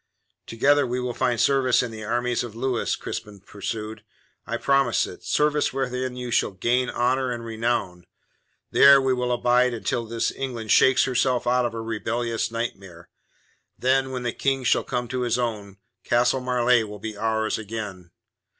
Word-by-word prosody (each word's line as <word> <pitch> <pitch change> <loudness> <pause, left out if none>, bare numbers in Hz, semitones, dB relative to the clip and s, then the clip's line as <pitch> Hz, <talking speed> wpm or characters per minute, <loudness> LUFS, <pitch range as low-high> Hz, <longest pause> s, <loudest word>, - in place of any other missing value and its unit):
"Together 140 +5 +2
we 125 +1 -2
will 125 -1 -3
find 125 -2 0
service 130 +1 +3
in 120 - -5
the 110 -1 -8
armies 120 +2 -1
of 115 -3 -8
Louis," 125 0 -1
Crispin 105 -1 -7
pursued. 105 +2 -6 0.4
"I - - -2
promise 135 -4 +2
it. 90 - -11
Service 150 +11 +1
wherein 130 -1 -3
you 125 -1 -5
shall - - +2
gain 120 +6 0
honour 130 +2 0
and 120 -1 -5
renown. 110 -6 -2 0.6
There 140 0 +8
we 135 -1 +1
will 125 -1 -1
abide 125 0 +2
until 115 +1 -2
this 115 0 -1
England 120 -5 -5
shakes 130 -1 +5
herself 125 -1 +1
out 125 0 +2
of 115 - -8
her 115 0 -5
rebellious 115 +1 -2
nightmare. 95 -7 -6 0.7
Then, 130 +1 +1
when 130 -1 -4
the 120 - -2
King 135 -1 -1
shall - - +2
come 125 -2 -3
to 130 0 -2
his 120 -1 0
own, 105 -5 -4 0.3
Castle 125 +2 +2
Marleigh 125 -1 +2
will 105 0 -8
be 110 +1 -6
ours 110 +1 -1
again. 105 -5 -7
120 Hz, 170 wpm, -24 LUFS, 110-125 Hz, 0.7 s, There